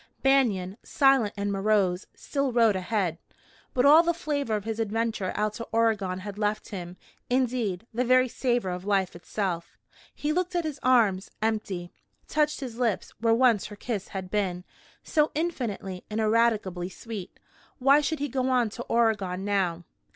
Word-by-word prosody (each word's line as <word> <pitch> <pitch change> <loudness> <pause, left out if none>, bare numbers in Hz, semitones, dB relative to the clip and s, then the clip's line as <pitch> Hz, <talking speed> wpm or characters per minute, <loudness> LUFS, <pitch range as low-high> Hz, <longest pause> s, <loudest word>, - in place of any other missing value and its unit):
Banion, 220 -9 +2
silent 270 -7 +3
and 200 0 -1
morose, 195 -2 +1
still 275 -2 -2
rode 230 -4 +4
ahead, 185 -3 -1 0.6
but 250 +1 +3
all 300 +3 +9
the 340 0 0
flavor 285 -8 -1
of 210 - -3
his 225 +1 -4
adventure 225 -3 -1
out 210 0 0
to 230 - -7
Oregon 210 -5 +1
had 205 +1 -7
left 210 0 -1
him 180 -2 -7 0.3
indeed, 240 -6 0
the 245 +3 +1
very 255 +1 +4
savor 240 -5 -1
of 180 0 -5
life 195 -3 0
itself. 175 -1 -4 0.4
He 300 +1 -1
looked 360 +1 -1
at 345 - +1
his 305 -3 -4
arms, 220 -7 +3
empty; 205 -5 -2 0.4
touched 300 -1 0
his 245 -3 -6
lips, 230 -6 0
where 225 0 +3
once 235 -4 +3
her 210 - -9
kiss 205 -2 -4
had 190 -1 -6
been, 185 -4 -1 0.4
so 300 -1 +2
infinitely 230 - -3
and 215 +1 -2
ineradicably 215 -5 +1
sweet. 200 0 -8 0.4
Why 275 +3 +5
should 305 +2 -1
he 290 0 -2
go 260 0 -1
on 245 -4 +2
to 240 - -7
Oregon 205 -5 +1
now? 185 -4 0
220 Hz, 165 wpm, -27 LUFS, 195-255 Hz, 0.6 s, all